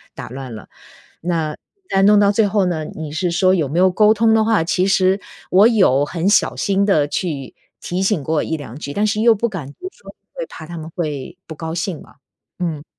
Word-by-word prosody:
打 - - -8
乱 130 -1 -7
了。 110 - -11 0.5
那 165 -3 -2 0.3
但 195 0 +3
弄 210 0 +6
到 200 -1 +4
最 210 +1 +2
后 200 -1 +1
呢 165 -4 -2
你 155 -1 -7
是 170 +3 -1
说 185 +2 +3
有 160 -6 0
没 155 +6 -1
有 185 +1 +5
沟 210 +3 +4
通 225 +1 +3
的 220 -1 +3
话， 220 -6 +2
其 180 +2 +1
实， 190 0 +3 0.3
我 200 +4 +7
有 185 - +3
很 170 +5 -1
小 205 - +3
心 200 0 +1
地 155 -8 +2
去 145 -6 -4 0.3
提 180 +2 -3
醒 195 -6 0
过 155 +1 0
1-2 145 -6 -5
句， 140 -2 -6
但 205 +5 +1
是 210 +1 0
又 230 0 +5
不 235 +3 -1
敢 160 -10 -7
多 370 - -8
说， 480 - -14 0.2
会 - - -5
怕 160 - -10
他 170 +1 -7
们 160 0 -7
会 155 -1 -4
不 160 - -7
高 160 +1 -5
兴 175 -2 -3
嘛， - - -17 0.4
嗯。 160 -5 -3
180 Hz, 230 characters per minute, -19 LUFS, 155-200 Hz, 0.5 s, 我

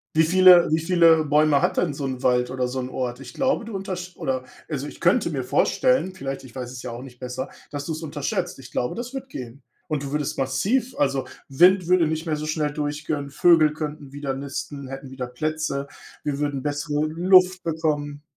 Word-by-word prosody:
Wie 160 - +5
viele 180 +1 +7
wie 160 - +3
viele 165 -2 +5
Bäume 150 0 +3
hat 180 +1 +1
denn 165 -5 +1
so 140 - -5
'n 130 -2 -3
Wald 125 0 +2
oder 130 -1 -1
so 130 +1 -3
'n 125 - -4
Ort? 125 -1 -4
Ich 125 -2 -10
glaube, 265 -3 0
du 225 -3 -5
untersch 185 -2 -5
oder, 130 -1 -2 0.3
also 145 -2 -3
ich - - -11
könnte 175 +2 +3
mir 135 -5 -3
vorstellen, 255 - +2
vielleicht, 135 -6 -5
ich 130 -3 -13
weiß 125 -1 -5
es 130 -1 -8
ja 125 - -5
auch 120 +1 -7
nicht 125 -2 -12
besser, 130 +1 -4 0.2
dass 145 -1 -5
du 165 - -2
es 160 +1 -6
unterschätzt. 145 -3 -3
Ich 130 -2 -12
glaube, 125 - -1
das 245 +3 -6
wird 270 0 -6
gehen. 125 - -8 0.2
Und 155 -5 -2
du 140 - -5
würdest 150 -1 -2
massiv 195 - 0
also, 135 -1 +1 0.2
Wind 180 +6 +5
würde 180 -1 +4
nicht 160 +1 -3
mehr 160 - 0
so 150 +1 -4
schnell 155 -1 -1
durchkönnen, 145 -1 -3
Vögel 155 0 +5
könnten 150 -2 -6
wieder 140 -1 -3
nisten, 140 0 -6
hätten 135 0 -8
wieder 130 -2 -5
Plätze, 150 +1 -2 0.4
wir 145 -2 -2
würden 145 -2 -1
bessere 145 +1 -1
Luft 180 +3 +4
bekommen. 150 -3 -2
150 Hz, 210 wpm, -24 LUFS, 135-170 Hz, 0.4 s, viele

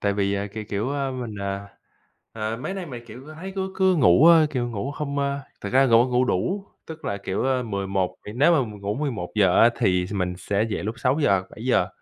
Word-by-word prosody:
tại 100 -1 +1
vì, 100 0 0
à, 100 0 -2
kiểu, 110 0 -5
kiểu, 105 +6 -2
a, 140 -1 -1
mình, 125 -4 -5
ờ, 100 0 -4 0.7
ờ, 110 0 -3
mấy 130 +10 -5
nay 190 -3 -5
mình, 120 -3 -8
kiểu, 130 +4 -11
ơ, 155 - -10
thấy 185 +5 -7
cứ 190 0 -2
cứ 190 -1 +3
ngủ, 130 - +6
ơ, 165 -2 +7
kiểu, 125 -4 -1
ngủ 115 +5 -3
hông, 145 -2 -3
a 140 0 -1 0.2
thực 100 - -5
ra 135 +1 +5
ngủ 115 0 +5
ngủ 125 +1 +2
đủ, 185 - -1 0.2
tức 160 0 -10
là, 100 - -2
kiểu, 100 +3 -3
a 130 -1 +1
mười 100 -4 -3
một 95 -2 -1 0.2
nếu 145 +8 +4
mà 160 - +4
mình 105 -4 -8
ngủ 100 +1 -2
11:00 105 -8 +1
á 115 - +7
thì 90 -5 +2
s 95 - -8
mình 90 -3 -1
sẽ 100 +3 0
dậy - - -2
lúc 110 +2 -3
6:00-7:00 120 - +1
120 Hz, 235 wpm, -24 LUFS, 100-140 Hz, 0.7 s, ơ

